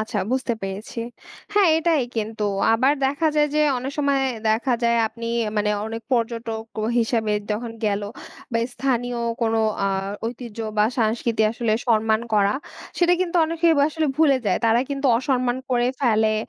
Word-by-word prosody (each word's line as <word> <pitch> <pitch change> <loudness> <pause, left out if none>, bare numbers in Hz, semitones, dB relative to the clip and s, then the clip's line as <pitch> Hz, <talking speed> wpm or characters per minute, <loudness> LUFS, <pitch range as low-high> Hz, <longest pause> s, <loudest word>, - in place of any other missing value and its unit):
আচ্ছা 215 - -3
বুঝতে 260 -2 0
পেরেছি। 195 +4 -6 0.6
হ্যাঁ, 410 -3 +5
এটাই 325 -3 +2
কিন্তু। 220 -1 -2 0.3
আবার 255 +5 +3
দেখা 285 +4 0
যায় 295 0 +4
যে 305 - +3 0.2
অনেক 260 +3 -5
সময় 280 -1 +2 0.3
দেখা 235 +4 +1
যায় 235 0 +3
আপনি 230 +1 -8 0.3
মানে 210 0 +1 0.2
অনেক 225 +1 -5
পর্যটক 230 -2 -1 0.2
ও - - 0
হিসেবে 225 -2 +1 0.2
যখন 225 +2 -3
গেল 205 -1 0 0.5
বা 230 - +2 0.2
স্থানীয় 245 -2 -1 0.2
কোনো 225 0 +1 0.3
আ - - +2 0.4
ঐতিহ্য 235 -1 -7 0.2
বা 210 - +5
সাংস্কৃতি 225 0 +1
আসলে 230 -1 -1
সম্মান 220 -1 +2
করা। 205 -1 +3 0.4
সেটা 350 0 +4
কিন্তু 360 -1 0
অনেকেই 330 +1 +2
আসলে 310 +2 +1
ভুলে 305 -4 +4
যায়। 185 - +2
তারা 225 +1 +4
কিন্তু 275 0 -1
অসম্মান 255 -2 0
করে 240 -1 +2
ফেলে 220 -4 +3
235 Hz, 155 wpm, -23 LUFS, 220-275 Hz, 0.6 s, হ্যাঁ